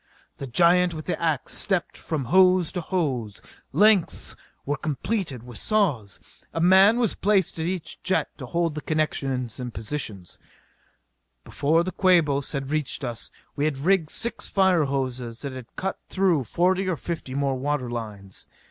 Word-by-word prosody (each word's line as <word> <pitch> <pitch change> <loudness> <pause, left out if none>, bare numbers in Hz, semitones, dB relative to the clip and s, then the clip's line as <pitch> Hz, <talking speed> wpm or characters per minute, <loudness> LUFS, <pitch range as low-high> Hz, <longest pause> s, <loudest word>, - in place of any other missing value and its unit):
The 140 - -5
giant 175 +5 +4
with 155 - -7
the 180 - -3
ax 160 -5 0
stepped 190 -4 0
from 150 -5 -3
hose 185 +2 +4
to 180 - -3
hose. 135 - -2 0.3
Lengths 200 +3 +3 0.3
were 145 - 0
completed 155 - -3
with 120 -4 -9
the - - -4
saws. 145 - 0 0.4
A - - 0
man 190 +6 +6
was 235 -5 +1
placed 195 -5 +1
at 160 - -1
each 175 -4 -4
jet 190 - -1
to 130 - -6
hold 170 +3 0
the 150 - -5
connections 135 -6 -2
in 125 -1 -4
position. 110 -5 -4 1.2
Before 160 +4 +1
the 185 - -3
Quabos 160 -8 +2
had 135 -1 -3
reached 150 -4 -1
us 120 -2 -3 0.3
we 145 - 0
had 155 -3 0
rigged 165 +2 +2
six 235 +7 -2
fire 190 -5 +3
hoses 130 -3 -3
and 135 -2 -5
had 130 -2 -10
cut 190 0 -3
through 180 -8 +2
forty 185 - +1
or 175 - -1
fifty 160 -6 -5
more 140 -1 +1
water 140 0 -1
lines. 105 -5 -7
155 Hz, 165 wpm, -25 LUFS, 130-185 Hz, 1.2 s, man